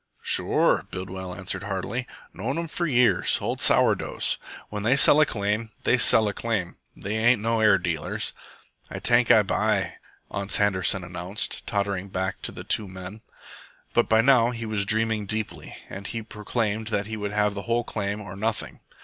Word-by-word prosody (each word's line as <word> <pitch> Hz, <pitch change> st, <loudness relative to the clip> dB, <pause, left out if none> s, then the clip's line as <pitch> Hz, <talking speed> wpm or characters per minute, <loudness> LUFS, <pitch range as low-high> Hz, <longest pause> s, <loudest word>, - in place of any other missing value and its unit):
"Sure," -, -, +2 dB
Bidwell 95 Hz, 0 st, -6 dB
answered 95 Hz, -1 st, -4 dB
heartily. 100 Hz, +5 st, -4 dB, 0.3 s
"Known 120 Hz, +9 st, -3 dB
'em 170 Hz, 0 st, -3 dB
for 170 Hz, +2 st, -2 dB
years. 120 Hz, -9 st, +3 dB
Old -, -, -3 dB
sour -, -, +5 dB
doughs. -, -, 0 dB, 0.3 s
When 105 Hz, -1 st, -5 dB
they 120 Hz, +6 st, +2 dB
sell 145 Hz, +2 st, +7 dB
a 155 Hz, -, +4 dB
claim, 105 Hz, +2 st, -2 dB
they 120 Hz, -, +3 dB
sell 110 Hz, -2 st, +6 dB
a 105 Hz, -, -2 dB
claim. 105 Hz, -5 st, -3 dB, 0.2 s
They 100 Hz, +2 st, -4 dB
ain't 120 Hz, +1 st, +3 dB
no 115 Hz, +1 st, 0 dB
air 110 Hz, -3 st, +5 dB
dealers." 85 Hz, -4 st, -3 dB, 0.6 s
"Ay -, -, -6 dB
tank -, -, +3 dB
Ay -, -, +6 dB
buy," -, -, 0 dB, 0.3 s
Ans 100 Hz, 0 st, -1 dB
Handerson 100 Hz, -2 st, +1 dB
announced, 90 Hz, +4 st, -4 dB
tottering 100 Hz, -2 st, -2 dB
back 95 Hz, 0 st, -3 dB
to -, -, -1 dB
the -, -, -9 dB
two 105 Hz, -, 0 dB
men. 95 Hz, +3 st, -9 dB, 0.7 s
But -, -, +2 dB
by 110 Hz, 0 st, +5 dB
now 120 Hz, -2 st, +4 dB
he 115 Hz, -2 st, -5 dB
was 105 Hz, -2 st, 0 dB
dreaming 110 Hz, -1 st, +2 dB
deeply, 110 Hz, +1 st, -4 dB
and 100 Hz, +1 st, -8 dB
he 115 Hz, -1 st, -5 dB
proclaimed 110 Hz, +1 st, -3 dB
he 110 Hz, 0 st, -2 dB
would 105 Hz, -1 st, -4 dB
have 105 Hz, 0 st, +1 dB
the 100 Hz, -, -5 dB
whole 120 Hz, +1 st, +1 dB
claim 105 Hz, -1 st, -4 dB
or 100 Hz, -2 st, -9 dB
nothing. 110 Hz, +2 st, -3 dB
105 Hz, 175 wpm, -25 LUFS, 100-115 Hz, 0.7 s, sell